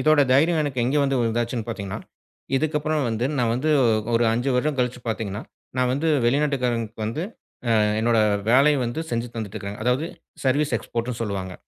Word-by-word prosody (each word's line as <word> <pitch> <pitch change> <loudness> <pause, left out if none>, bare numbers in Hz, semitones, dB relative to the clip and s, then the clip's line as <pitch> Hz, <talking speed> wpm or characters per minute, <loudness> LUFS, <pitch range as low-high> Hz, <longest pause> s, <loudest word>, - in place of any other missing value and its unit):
இதோட 155 -1 +4
தைரியம், 155 +4 +4
எனக்கு 135 -4 -2
எங்க 135 +4 +1
வந்து 135 -1 +1
இருந்தாச்சுன்னு 115 0 -1
பாத்தீங்கன்னா, 100 -4 -4 0.6
இதுக்கு 150 +2 0
அப்புறம் 155 0 0
வந்து 115 +2 -1
நான் 120 -2 +2
வந்து 150 +6 0 0.4
ஒரு 115 +1 +3
5 120 +4 0
வருடம் 145 +3 +1
கழிச்சு 125 0 0
பாத்தீங்கன்னா 105 -2 -3 0.4
நான் 125 0 +2
வந்து 150 +5 0 0.2
வெளிநாட்டுக்காரங்களுக்கு 120 -5 0
வந்து 115 +10 -2 0.5
அ - - +4 0.2
என்னோட 115 0 +3 0.3
வேலையை 140 +4 +5
வந்து 120 +7 -3
செஞ்சு 115 +1 -1
தந்துட்டு 110 -2 -5
இருக்கேன். 100 0 -6
அதாவது 125 +7 +1 0.4
சர்வீஸ் 140 0 +2
எக்ஸ்போர்ட்ன்னு 115 +1 -4
சொல்லுவாங்க. 95 -3 -4
125 Hz, 165 wpm, -24 LUFS, 115-145 Hz, 0.6 s, வேலையை